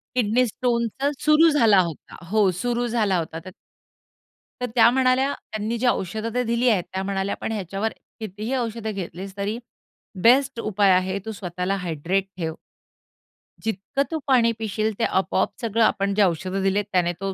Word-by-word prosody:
Kidney 245 +1 +3
स्टोनच 245 +4 -1
सुरु 310 +2 +6
झाला 230 -10 +5
होता 165 -3 -8
हो, 210 -1 +3
सुरु 245 0 0
झाला 215 -5 +1
होता 165 0 -4
तर - - -7 1.1
तर - - +1
त्या 235 -1 +7
म्हणाल्या 260 +2 +2 0.2
त्यांनी 215 +2 -2
जी 250 +2 0
औषध 215 0 -1
ते 250 - +1
दिली 235 +1 +1
आहेत, 190 -6 +2
त्या 190 0 -2
म्हणाल्या 195 0 -2
पण - - -3
ह्याच्यावर 200 +1 -3 0.3
कितीही 215 +4 -5
औषध 230 -2 -3
घेतलीस 195 -1 -6
तरी 205 +3 -2 0.7
बेस्ट 260 +1 +4
उपाय 205 -3 +2
आहे 185 +2 +1
तू 220 - -4
स्वतःला 180 -1 -3
हायड्रेट 180 +2 -1
ठेव. 160 -2 -3 1.1
जितकं 220 +6 -1
तू 320 - -1
पाणी 240 -3 +4
पिशील 220 0 -1
ते - - +1
आपोआप 190 0 +1
सगळं, 230 0 +1
आपण 200 -2 +1
जे 210 - +3
औषध 185 +1 -1
दिलेत 195 +1 +1
त्याने 175 -2 +2
तो 195 -1 -2
215 Hz, 165 wpm, -23 LUFS, 190-235 Hz, 1.1 s, त्या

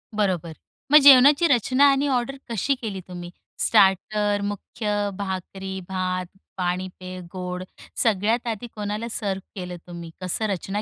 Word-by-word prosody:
बरोबर, 185 -6 0 0.4
मग 300 - +10
जेवणाची 280 +4 +8
रचना 255 0 +3
आणि 275 +1 +1
ऑर्डर 250 +1 -1
कशी 235 +5 0
केली 215 -6 -5
तुम्ही. 175 -1 -8 0.3
स्टार्टर, 205 +2 +3
मुख्य 205 0 -2
भाकरी, 190 0 -5
भात, 185 -1 -2 0.3
पाणी, 180 0 -1
पेय, 185 0 -7
गोड, 180 -1 -4 0.4
सगळ्यात 225 +3 +1
आधी 230 +1 -3
कोणाला 210 +2 -3
सर्व्ह 195 -4 -3
केलं 180 -1 -6
तुम्ही, 170 -1 -8
कसं 185 +4 -1
रचना 195 +2 -3
200 Hz, 135 wpm, -24 LUFS, 185-230 Hz, 0.4 s, मग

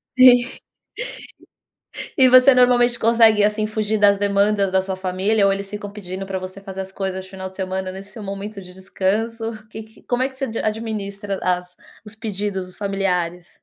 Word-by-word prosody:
Sim 250 -1 +7 1.7
e 260 -2 +6
você 255 +1 +7
normalmente 245 -1 +4
consegue, 225 -2 +5
assim, 210 +1 +1
fugir 215 0 -1
das 200 -1 +5
demandas 200 0 +2
da 190 - +4
sua 190 0 -4
família, 190 +3 +1
ou 195 - +3
eles 195 0 -4
ficam 205 0 -6
pedindo 190 -2 -6
para 190 -1 -3
você 185 +1 -8
fazer 195 -1 -7
as 190 0 -11
coisas 190 -1 -4
final 190 0 -7
de 190 - -21
semana 190 0 -3
nesse 195 +4 -11
momento 200 +1 -6
de 180 0 -13
descanso, 205 +5 -2 0.3
que 220 - -7
que 220 0 -19
como 245 +1 0
é 265 - +1
que 265 - -18
você 270 - -2 0.2
administra 205 -3 -3
as 180 0 -1 0.3
os 210 +1 -12
pedidos 205 -3 -3
dos 185 - -15
familiares? 180 -3 -2
200 Hz, 175 wpm, -21 LUFS, 190-220 Hz, 1.7 s, Sim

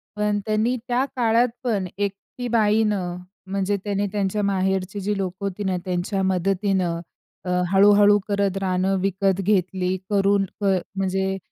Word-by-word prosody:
पण 210 0 0
त्यांनी 220 +3 +1
त्या 250 +2 +1
काळात 235 0 +3 0.2
पण 205 -6 0
एकटी 205 +5 -4
बाईनं 210 -5 +1 0.3
म्हणजे, 200 +1 0
त्याने 205 0 -1
त्यांच्या 205 0 -1
माहेरची 190 0 0
जी 205 +1 -1
लोकं 190 +1 -4
होती 200 +1 -3
ना 185 -2 0
त्यांच्या 185 +2 -1
मदतीनं 190 -1 0 0.5
अ, - - -3 0.2
हळू-हळू 205 +1 +6
करत 200 -1 0
रानं 190 +1 +1
विकत 195 0 +1
घेतली, 185 -1 +1
करून 200 -1 +2 0.2
क - - 0 0.3
म्हणजे 190 0 -1
195 Hz, 135 wpm, -23 LUFS, 190-205 Hz, 0.5 s, हळू-हळू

